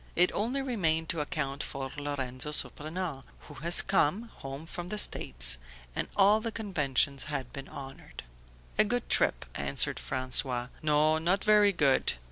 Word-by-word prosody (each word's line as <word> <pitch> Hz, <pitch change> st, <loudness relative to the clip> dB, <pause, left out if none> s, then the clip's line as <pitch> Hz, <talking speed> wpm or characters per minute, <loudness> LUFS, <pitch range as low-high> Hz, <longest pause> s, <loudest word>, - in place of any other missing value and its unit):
it 180 Hz, +1 st, +3 dB
only 250 Hz, +6 st, -2 dB
remained 165 Hz, -11 st, 0 dB
to 160 Hz, -2 st, 0 dB
account 140 Hz, -2 st, -3 dB
for 135 Hz, -1 st, -5 dB
Lorenzo 145 Hz, -1 st, -3 dB
Surprenant, 155 Hz, -1 st, -1 dB, 0.2 s
"who -, -, -14 dB
has 170 Hz, +6 st, +2 dB
come, 190 Hz, +4 st, 0 dB
home 135 Hz, +3 st, -8 dB
from 175 Hz, +1 st, -7 dB
the 210 Hz, -, -4 dB
States" 60 Hz, -, +5 dB, 0.4 s
and -, -, -2 dB
all 205 Hz, +2 st, +4 dB
the 230 Hz, -, -4 dB
conventions 150 Hz, -, 0 dB
had 135 Hz, -5 st, -5 dB
been 140 Hz, 0 st, -8 dB
honoured. 135 Hz, -1 st, -10 dB, 0.6 s
"A -, -, +7 dB
good 245 Hz, +3 st, -2 dB
trip," -, -, +3 dB
answered 70 Hz, 0 st, +1 dB
François. 130 Hz, -1 st, 0 dB
"No, 155 Hz, +1 st, +2 dB
not 180 Hz, +4 st, 0 dB
very 210 Hz, -1 st, +4 dB
good. 145 Hz, -, +1 dB
150 Hz, 150 wpm, -29 LUFS, 135-190 Hz, 0.6 s, A